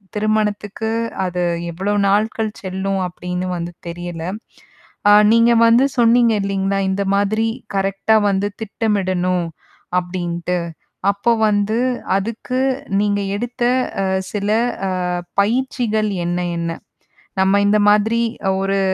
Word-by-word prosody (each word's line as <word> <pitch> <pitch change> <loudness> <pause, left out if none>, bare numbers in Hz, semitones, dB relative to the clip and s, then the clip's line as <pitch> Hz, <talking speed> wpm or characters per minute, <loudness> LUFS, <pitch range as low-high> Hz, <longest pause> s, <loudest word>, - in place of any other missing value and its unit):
திருமணத்துக்கு 215 0 -1 0.3
அது 180 -1 -2 0.3
எவ்ளோ 195 +5 -2
நாட்கள் 215 +2 +1
செல்லும் 190 +1 -2
அப்பிடின்னு 180 +1 -4
வந்து 170 0 -4 0.2
தெரியல. 175 -1 -6 0.9
ஆ - - +8 0.2
நீங்க 230 +1 +5
வந்து 235 +4 +5
சொன்னீங்க 235 -1 +4
இல்லீங்களா! 195 0 -1
இந்த 195 +1 0
மாதிரி 215 +3 +1 0.3
கரெக்ட்டா 195 +3 +1
வந்து 195 +1 0
திட்டமிடணும் 185 -5 0 0.6
அப்பிடின்ட்டு. 175 0 -3 0.5
அப்போ 200 +4 0 0.2
வந்து, 210 +2 +1 0.4
அதுக்கு 230 +5 -3 0.4
நீங்க 205 -1 +1
எடுத்த 240 +2 -4 0.4
அ - - 0 0.3
சில 205 0 -2 0.4
அ, - - -1 0.5
பயிற்சிகள் 220 -1 0 0.2
என்ன, 175 +1 -1 0.2
என்ன? 170 0 -2 0.7
நம்ம 195 +1 +4
இந்த 210 +1 +4
மாதிரி 220 +3 +3 0.4
ஒரு 195 0 0
200 Hz, 110 wpm, -19 LUFS, 185-220 Hz, 0.9 s, ஆ